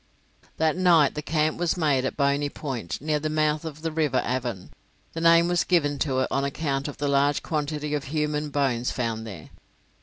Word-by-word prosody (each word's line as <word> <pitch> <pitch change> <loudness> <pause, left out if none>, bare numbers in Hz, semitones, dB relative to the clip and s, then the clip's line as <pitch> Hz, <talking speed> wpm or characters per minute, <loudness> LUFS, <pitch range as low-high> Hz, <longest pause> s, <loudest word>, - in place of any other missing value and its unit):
That 160 +1 +2
night 170 -6 +4
the 150 - -4
camp 155 +1 0
was 175 0 0
made 145 -6 +2
at - - -3
Boney 140 0 +1
Point, 120 - -5
near 150 0 0
the 155 +1 -2
mouth 155 0 +1
of 155 -1 -8
the 165 - -1
River 150 -5 +1
Avon; 120 -6 -3 0.4
the 165 - -4
name 170 0 +6
was 175 0 +2
given 145 -6 +1
to 130 -3 0
it - - +1
on 135 - 0
account 140 -1 -2
of 145 - -7
the 145 - -1
large 140 +1 +2
quantity 150 -1 -2
of 145 -2 -2
human 150 +1 -1
bones 130 -4 0
found 115 -2 -3
there. 85 -8 -10
145 Hz, 200 wpm, -25 LUFS, 135-155 Hz, 0.4 s, name